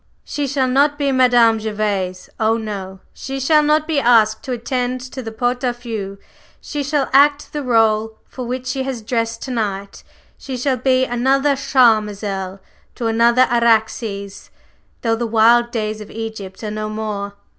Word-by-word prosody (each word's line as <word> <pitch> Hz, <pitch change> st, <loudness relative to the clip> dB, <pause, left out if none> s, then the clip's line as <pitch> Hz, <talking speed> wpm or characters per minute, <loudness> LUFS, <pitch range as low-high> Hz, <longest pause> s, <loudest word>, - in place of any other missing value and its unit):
She 290 Hz, -1 st, -3 dB
shall 265 Hz, -1 st, 0 dB
not 285 Hz, +3 st, +2 dB
be 285 Hz, -1 st, 0 dB
Madame 245 Hz, -3 st, +4 dB
Gervase, 205 Hz, -4 st, -2 dB
oh, 220 Hz, +1 st, +2 dB
no! 195 Hz, -4 st, -6 dB
She 270 Hz, 0 st, -6 dB
shall 300 Hz, +3 st, +4 dB
not 300 Hz, +1 st, +2 dB
be 310 Hz, -3 st, 0 dB
asked 225 Hz, -3 st, +4 dB
to 260 Hz, -, -4 dB
attend 250 Hz, +1 st, -2 dB
to 260 Hz, +1 st, -7 dB
the 225 Hz, -2 st, -6 dB
pot 245 Hz, +3 st, -1 dB
au 245 Hz, -1 st, +1 dB
feu; 220 Hz, -5 st, -6 dB, 0.4 s
she 295 Hz, -, -5 dB
shall 285 Hz, -1 st, 0 dB
act 285 Hz, +1 st, +4 dB
the 300 Hz, -, -2 dB
rôle 225 Hz, -4 st, +2 dB
for 255 Hz, -, -7 dB
which 250 Hz, +1 st, -4 dB
she 260 Hz, +1 st, -2 dB
has 260 Hz, -4 st, -4 dB
dressed 230 Hz, 0 st, -2 dB
to 265 Hz, -, -5 dB
night; 200 Hz, -4 st, -3 dB, 0.4 s
she 265 Hz, -2 st, -6 dB
shall 260 Hz, +1 st, 0 dB
be 255 Hz, +1 st, +2 dB
another 270 Hz, +4 st, +2 dB
Charmazel 210 Hz, -7 st, +1 dB, 0.4 s
to 240 Hz, -, -4 dB
another 235 Hz, +3 st, +4 dB
Araxes, 220 Hz, -3 st, 0 dB, 0.5 s
though 225 Hz, -1 st, +2 dB
the 235 Hz, +1 st, -2 dB
wild 230 Hz, +2 st, +4 dB
days 215 Hz, -2 st, -3 dB
of 210 Hz, -, -10 dB
Egypt 220 Hz, -3 st, -7 dB
are 210 Hz, -, -3 dB
no 215 Hz, 0 st, -4 dB
more!" 210 Hz, -2 st, -4 dB
235 Hz, 165 wpm, -19 LUFS, 215-260 Hz, 0.5 s, Madame